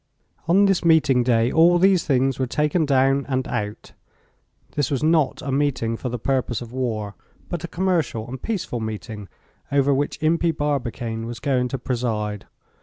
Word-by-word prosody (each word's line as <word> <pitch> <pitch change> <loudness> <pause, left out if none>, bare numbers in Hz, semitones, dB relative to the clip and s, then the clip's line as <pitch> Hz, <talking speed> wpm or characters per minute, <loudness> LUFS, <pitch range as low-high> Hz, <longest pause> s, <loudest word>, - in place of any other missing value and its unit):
On 190 +4 +5
this 195 -2 +2
meeting 155 -6 +4
day 120 -1 +2
all 170 +2 +5
these 185 -1 +4
things 135 -1 +1
were 130 - 0
taken 150 +4 +1
down 135 0 +3
and 130 -1 -1
out. 105 0 -4 0.8
This 145 -3 -1
was 140 -2 -1
not 155 -4 +2
a 140 - -3
meeting 135 -5 0
for 125 - -4
the 125 - -3
purpose 130 -1 -1
of 120 -1 -9
war, 110 -6 -2 0.4
but 175 -3 -4
a - - -3
commercial 165 -11 -1
and 130 +1 -7
peaceful 195 - -3
meeting 110 -2 -6 0.4
over 140 0 +3
which 145 +2 -1
Impey 165 +2 +2
Barbicane 120 -6 -3
was 120 0 -6
going 130 -3 0
to 135 - -3
preside. 110 -5 -3
135 Hz, 170 wpm, -23 LUFS, 120-155 Hz, 0.8 s, On